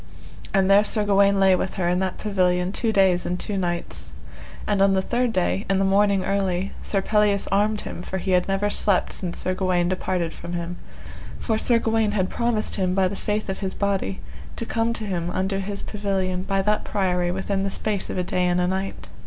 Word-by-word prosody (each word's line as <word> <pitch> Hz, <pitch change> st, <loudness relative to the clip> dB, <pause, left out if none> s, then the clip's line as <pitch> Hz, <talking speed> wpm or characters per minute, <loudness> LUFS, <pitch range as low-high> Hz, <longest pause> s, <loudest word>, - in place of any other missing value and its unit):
And 195 Hz, -1 st, +3 dB
there 200 Hz, +1 st, +6 dB
Sir 215 Hz, 0 st, +1 dB
Gawaine 200 Hz, -1 st, +3 dB
lay 190 Hz, -1 st, +5 dB
with 190 Hz, -, -3 dB
her 180 Hz, -2 st, 0 dB
in 180 Hz, +1 st, +1 dB
that 190 Hz, -1 st, -2 dB
pavilion 180 Hz, -3 st, +1 dB
two 225 Hz, +2 st, -1 dB
days 190 Hz, -4 st, +3 dB
and 180 Hz, 0 st, -2 dB
two 205 Hz, -, -3 dB
nights. 170 Hz, -, -1 dB, 0.5 s
And 200 Hz, -2 st, +1 dB
on 195 Hz, 0 st, +5 dB
the 190 Hz, -, +2 dB
third 245 Hz, +2 st, 0 dB
day, 190 Hz, 0 st, 0 dB
in 195 Hz, -, +3 dB
the 195 Hz, -, +2 dB
morning 195 Hz, 0 st, +3 dB
early, 195 Hz, -1 st, 0 dB
Sir 195 Hz, -2 st, 0 dB
Pelleas 210 Hz, -1 st, +2 dB
armed 210 Hz, +2 st, +2 dB
him, -, -, -6 dB
for 190 Hz, -, -4 dB
he 190 Hz, +1 st, -2 dB
had 180 Hz, -1 st, +3 dB
never 195 Hz, +1 st, 0 dB
slept 200 Hz, -3 st, +1 dB
since 175 Hz, -3 st, -4 dB
Sir 185 Hz, -, -1 dB
Gawaine 185 Hz, -2 st, +1 dB
departed 180 Hz, -3 st, -1 dB
from 170 Hz, +1 st, -8 dB
him; 175 Hz, 0 st, -4 dB, 0.6 s
for 220 Hz, -1 st, -1 dB
Sir 235 Hz, 0 st, +4 dB
Gawaine 225 Hz, -2 st, +1 dB
had 190 Hz, -3 st, 0 dB
promised 235 Hz, -3 st, -1 dB
him 185 Hz, -2 st, 0 dB
by 190 Hz, -1 st, +3 dB
the 195 Hz, -, -4 dB
faith 210 Hz, +2 st, -2 dB
of 190 Hz, -, -4 dB
his 190 Hz, -2 st, -3 dB
body, 195 Hz, -1 st, -1 dB, 0.4 s
to 230 Hz, -, -4 dB
come 225 Hz, 0 st, 0 dB
to 220 Hz, -2 st, -4 dB
him 175 Hz, -4 st, -2 dB
unto 190 Hz, +2 st, -1 dB
his 200 Hz, +1 st, -4 dB
pavilion 195 Hz, -3 st, -2 dB
by 195 Hz, +1 st, 0 dB
that 210 Hz, +1 st, +1 dB
priory 180 Hz, -3 st, 0 dB
within 190 Hz, +2 st, -1 dB
the 195 Hz, -, -1 dB
space 205 Hz, 0 st, -2 dB
of -, -, -4 dB
a 180 Hz, -, 0 dB
day 180 Hz, 0 st, 0 dB
and 175 Hz, 0 st, +1 dB
a 180 Hz, -, +2 dB
night. 190 Hz, +1 st, -3 dB
195 Hz, 220 wpm, -23 LUFS, 185-205 Hz, 0.6 s, there